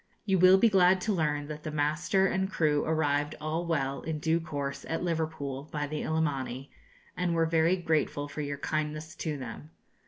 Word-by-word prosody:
You 190 -3 +2
will 185 +2 +8
be 230 - +5
glad 190 -2 +5
to 215 +2 0
learn 150 -4 0
that 150 0 -6
the 155 - -5
master 155 +6 +1
and 190 0 0
crew 150 -5 +2
arrived 150 -2 0
all 160 +3 -2
well, 140 -4 -1
in 160 -1 -3
due 160 +2 +1
course, 145 -4 -4
at 165 - -2
Liverpool, 155 -5 -3
by 150 -1 -2
the 150 +1 -4
"Illimani," 140 -4 -2 0.4
and 180 -1 0
were 165 0 +3
very 165 +2 +3
grateful 155 -4 0
for 150 +1 -5
your 145 -1 -3
kindness 155 +1 -3
to 155 -3 -3
them. 115 - -8
155 Hz, 185 wpm, -29 LUFS, 145-170 Hz, 0.4 s, will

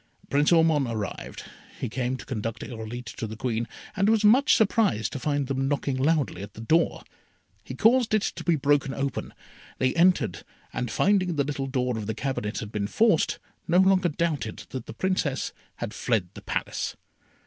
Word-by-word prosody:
Prince 145 +3 +3
Ormond 160 -5 +4
arrived. 110 -4 -5 0.4
He - - -2
came 125 +2 -2
to - - -10
conduct 115 -2 -4
Irolite 115 0 -6
to 110 - -3
the 110 - -7
Queen, 115 -1 -1 0.3
and 200 +1 +2
was 220 -1 +3
much 260 +7 +6
surprised 190 - +2
to 135 - -4
find 145 +1 0
them 135 0 -1
knocking 140 -1 0
loudly 140 - +1
at 100 0 -9
the 110 - -8
door. 160 +9 +2 0.6
He - - -7
caused 230 0 +4
it 215 - +2
to - - -3
be 170 - +3
broken 140 -1 +1
open. 135 -1 -3 0.5
They 130 0 +1
entered, 180 +2 +3 0.3
and 125 - -2
finding 185 - +2
the 145 - +2
little 140 -1 -3
door 125 -3 -1
of 105 - -5
the 110 - -2
cabinet 125 -4 -3
had 105 -1 -7
been 100 -2 -2
forced, 215 - +3 0.3
no 170 - +3
longer 190 -1 +4
doubted 150 -8 -2
that 130 -3 -6
the - - -7
Princess 185 -8 -1 0.2
had - - -5
fled 110 -7 0
the - - -10
Palace. - - -3
135 Hz, 180 wpm, -26 LUFS, 115-170 Hz, 0.6 s, much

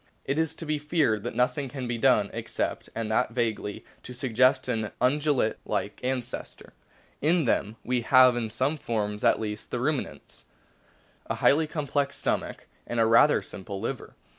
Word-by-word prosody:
It 140 +3 0
is 160 -1 0
to 165 - -7
be 155 -1 -1
feared 145 - +1
that - - -4
nothing 125 +3 0
can 130 -2 -5
be 120 -1 -2
done 110 -6 +3
except, 115 0 -3
and 115 -1 -3
that 110 - +1
vaguely, 110 -4 -2 0.2
to 125 - -9
suggest 130 +1 +2
an 110 -4 -1
Ungulate 140 -2 +2
like - - -3
ancestor. 125 -1 -4 0.5
In 160 +1 +3
them 110 -2 0
we 125 0 +1
have 130 +1 +6
in 115 -2 -2
some 135 +7 -1
forms, 105 -4 -2
at - - +4
least 105 -1 -5
the 125 - -3
Ruminants, 145 +2 -3 0.8
a - - -2
highly 155 +3 +3
complex 145 -2 -1
stomach - - -2 0.2
and 120 - -2
a 115 - +5
rather 115 +6 +5
simple 100 0 -7
liver. 115 +4 -5
125 Hz, 165 wpm, -27 LUFS, 110-140 Hz, 0.8 s, have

